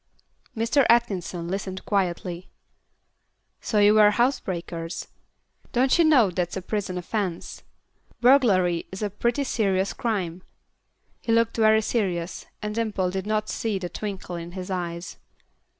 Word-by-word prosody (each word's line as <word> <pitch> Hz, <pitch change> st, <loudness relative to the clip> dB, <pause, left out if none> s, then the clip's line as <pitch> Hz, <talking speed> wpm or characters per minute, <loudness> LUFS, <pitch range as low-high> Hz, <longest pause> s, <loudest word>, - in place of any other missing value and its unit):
Mr. 235 Hz, +5 st, +3 dB
Atkinson 190 Hz, -7 st, +1 dB
listened 190 Hz, 0 st, -4 dB
quietly. 180 Hz, -2 st, -2 dB, 1.1 s
"So 215 Hz, -, -2 dB
you 205 Hz, 0 st, +6 dB
were 210 Hz, -1 st, +7 dB
housebreakers. 185 Hz, -8 st, -2 dB, 0.7 s
Don't 260 Hz, +6 st, +3 dB
you -, -, +7 dB
know 265 Hz, -, +5 dB
that's 175 Hz, +1 st, -2 dB
a -, -, -3 dB
prison 200 Hz, -2 st, -3 dB
offence? 180 Hz, -1 st, -3 dB, 0.6 s
Burglary 205 Hz, -10 st, +4 dB
is 190 Hz, +3 st, -5 dB
a 205 Hz, -, -1 dB
pretty 235 Hz, +7 st, 0 dB
serious 195 Hz, -6 st, 0 dB
crime." 190 Hz, -8 st, -2 dB, 0.8 s
He 230 Hz, -, -2 dB
looked 230 Hz, 0 st, +2 dB
very 220 Hz, 0 st, +4 dB
serious, 185 Hz, -7 st, -2 dB, 0.2 s
and 210 Hz, 0 st, -2 dB
Dimple 210 Hz, -5 st, -1 dB
did 190 Hz, +2 st, -4 dB
not 215 Hz, 0 st, 0 dB
see 220 Hz, -2 st, -2 dB
the 180 Hz, -2 st, -5 dB
twinkle 195 Hz, -4 st, -5 dB
in 170 Hz, +1 st, -8 dB
his 185 Hz, 0 st, -6 dB
eyes. 170 Hz, -1 st, -4 dB
200 Hz, 135 wpm, -25 LUFS, 180-225 Hz, 1.1 s, were